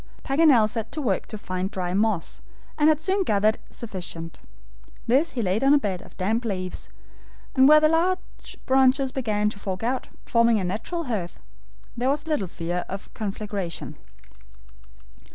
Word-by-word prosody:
Paganel 275 -6 +5
set 225 0 -4
to - - -3
work 225 -10 -1
to 215 - -6
find 185 -1 -3
dry 180 -3 -3
moss, 205 -3 0 0.3
and 300 +1 +4
had 310 -1 +3
soon 375 +5 +1
gathered 215 - +2
sufficient. 175 -6 -5 0.7
This 270 +8 +2
he 240 - -1
laid 195 +5 0
on 275 +2 +6
a - - +6
bed 195 -9 -2
of - - -16
damp 220 +6 0
leaves, 185 -5 -4 0.7
just 265 0 +6
where 305 +1 +8
the 310 - +4
large 355 +4 -1
branches 265 0 +3
began 215 -6 0
to 200 - -10
fork 190 0 -4
out, 255 +2 -2 0.2
forming 230 -1 +3
a - - -2
natural 220 - -3
hearth, 210 - -4
where - - -28
there 250 +2 +1
was 295 +3 0
little 300 -12 -1
fear 175 +1 -3
of 195 +1 -7
conflagration. 200 -4 -4
220 Hz, 165 wpm, -25 LUFS, 190-270 Hz, 0.7 s, where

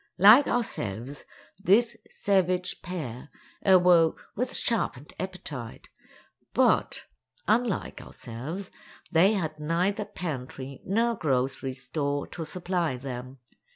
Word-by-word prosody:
Like 220 +9 +8
ourselves, 135 - -2 0.4
this 230 +4 +4
savage 185 -2 0
pair 150 -8 -6 0.3
awoke 180 -4 +4
with 250 +4 -2
sharpened 155 - -1
appetite, 150 -11 -6 0.7
but, - - +2 0.4
unlike 225 -2 0
ourselves, 145 - -7 0.4
they 185 +5 +5
had 160 -6 -2
neither 180 +7 0
pantry 135 -6 -6
nor 230 +5 +2
grocery 135 -4 -1
store 140 +1 -2
to 165 - -5
supply 175 -4 -2
them. 130 0 -7
170 Hz, 95 wpm, -27 LUFS, 135-195 Hz, 0.7 s, Like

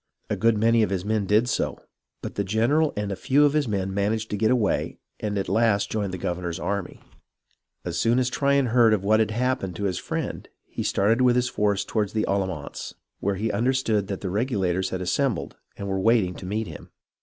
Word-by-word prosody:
A - - +2
good 115 -1 +2
many 115 +2 +4
of 110 - +2
his 95 -1 -2
men 105 -2 0
did 110 +4 +3
so, - - -1 0.5
but - - -5
the 100 - -1
general 120 +10 +2
and 105 -1 -2
a - - -2
few 140 +8 +3
of 145 - +2
his 150 -3 +1
men 95 -3 -2
managed 110 +3 -1
to - - 0
get 110 +2 +2
away 120 -6 +1 0.2
and 105 -1 -2
at 95 - -2
last 110 -3 +2
joined 105 -3 -1
the 95 - -4
governor's 85 0 -3
army. 100 +1 -3 0.8
As 85 -1 -2
soon 115 +6 +3
as 130 -1 +2
Tryon 140 -2 +2
heard 115 -3 +6
of 100 - -5
what 110 +2 +3
had 110 -2 +2
happened 115 -5 -1
to 100 - -5
his 95 -4 -1
friend, - - -4 0.2
he - - -6
started 110 +5 +2
with 125 -1 +4
his 125 0 +1
force 100 -3 0
toward 105 -3 -1
the 110 - +1
Allamance, 95 -7 -3 0.2
where 100 0 0
he 110 +3 -1
understood 115 -3 +1
the 100 -1 -4
Regulators 95 -5 0
had 95 0 -4
assembled 115 +1 -1 0.2
and 100 - -5
were 95 -1 -1
waiting 110 -3 +3
to 90 - -9
meet 110 +3 -2
him. - - -10
105 Hz, 215 wpm, -25 LUFS, 95-115 Hz, 0.8 s, heard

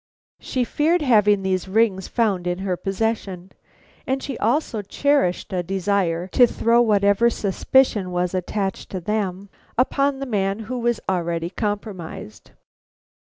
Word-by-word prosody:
She 255 - -2
feared 310 +7 +1
having 210 -6 +4
these 190 -1 -1
rings 195 -2 +1
found 200 -7 0
in 175 0 -1
her 190 -1 -2
possession, 195 -2 -3 0.6
and 265 +1 -1
she 275 - -4
also 235 -1 0
cherished 205 -3 0
a 180 - 0
desire 185 -2 0
to 245 +5 +5
throw 235 +1 +2
whatever 205 0 +3
suspicion 210 -1 +1
was 180 0 -1
attached 190 +1 -3
to 185 - -4
them 200 0 -2 0.3
upon 275 +2 +1
the 275 - -4
man 200 -3 -1
who 245 +3 -4
was 240 -1 0
already 170 -2 -1
compromised. 200 - -5
200 Hz, 135 wpm, -22 LUFS, 185-235 Hz, 0.6 s, to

